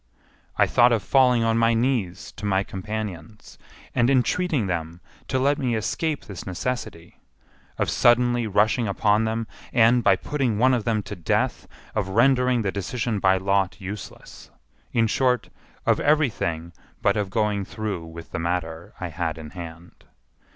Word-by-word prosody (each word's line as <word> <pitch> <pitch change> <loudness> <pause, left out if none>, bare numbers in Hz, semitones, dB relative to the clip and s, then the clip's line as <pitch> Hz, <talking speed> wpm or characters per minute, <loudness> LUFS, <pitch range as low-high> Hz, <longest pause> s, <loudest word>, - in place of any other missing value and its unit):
I - - +5
thought 120 +1 +4
of 115 -4 +1
falling 125 -3 +4
on 115 0 +2
my 115 0 +3
knees 115 -7 -1
to - - -6
my 95 -1 +2
companions, 105 -1 -7 0.3
and 120 +1 +2
entreating 140 - +1
them 85 -2 -3 0.3
to 130 - 0
let 140 +2 +2
me 125 -4 0
escape 150 +8 -2
this 100 -4 -8
necessity; 105 -2 -5 0.6
of - - 0
suddenly 120 -1 +3
rushing 110 +3 +2
upon 105 +2 +2
them, 110 +1 -2 0.3
and, 120 +1 +4
by - - +5
putting 135 -7 -1
one 130 +4 +4
of 120 -4 0
them 110 -3 0
to 100 +2 -7
death, 85 -4 -1 0.3
of 105 -3 -1
rendering 125 +2 +3
the 95 - -1
decision 105 +3 -2
by 95 -1 +4
lot 95 0 0
useless—in 100 - -6
short, 125 +2 +1 0.4
of - - +3
every 150 -3 +3
thing 85 -2 -4 0.3
but - - +3
of 105 -2 -1
going 105 -1 0
through 105 -4 -4
with 80 0 -10
the - - -3
matter 85 -1 -3
I 90 - -4
had 80 -1 -3
in 75 -1 -9
hand. 85 -1 -10
110 Hz, 160 wpm, -24 LUFS, 95-120 Hz, 0.6 s, I